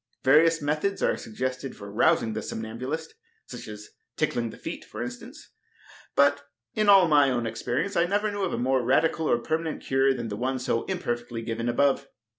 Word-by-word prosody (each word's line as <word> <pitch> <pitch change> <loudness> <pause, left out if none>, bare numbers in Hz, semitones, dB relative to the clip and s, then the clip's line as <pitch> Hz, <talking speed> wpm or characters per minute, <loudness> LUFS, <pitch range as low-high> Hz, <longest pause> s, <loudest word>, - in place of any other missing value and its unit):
Various 160 +4 +5
methods 155 +7 -1
are - - +2
suggested 130 +3 -5
for 100 0 -9
rousing 110 +1 +2
the 110 - -3
somnambulist, 125 +9 -5 0.3
such - - -9
as 105 0 -9 0.3
tickling 120 -6 0
the - - -11
feet, - - -6
for 110 +2 -6
instance; 120 0 -9 0.6
but 140 0 +4 0.3
in 215 -1 +1
all 195 -3 +8
my 145 -3 +5
own 120 -2 -1
experience, 125 - -2
I 170 - +3
never 205 +3 0
knew 205 0 -4
of 190 - 0
a - - -2
more 130 +1 +1
radical 160 +5 +2
or - - +4
permanent 160 +5 -3
cure 135 +1 +2
than 120 -2 -4
the 100 - -4
one 130 +3 -1
so 125 -2 -1
imperfectly 120 -10 -3
given 115 +1 -2
above. 140 +2 +2
130 Hz, 185 wpm, -26 LUFS, 120-160 Hz, 0.6 s, all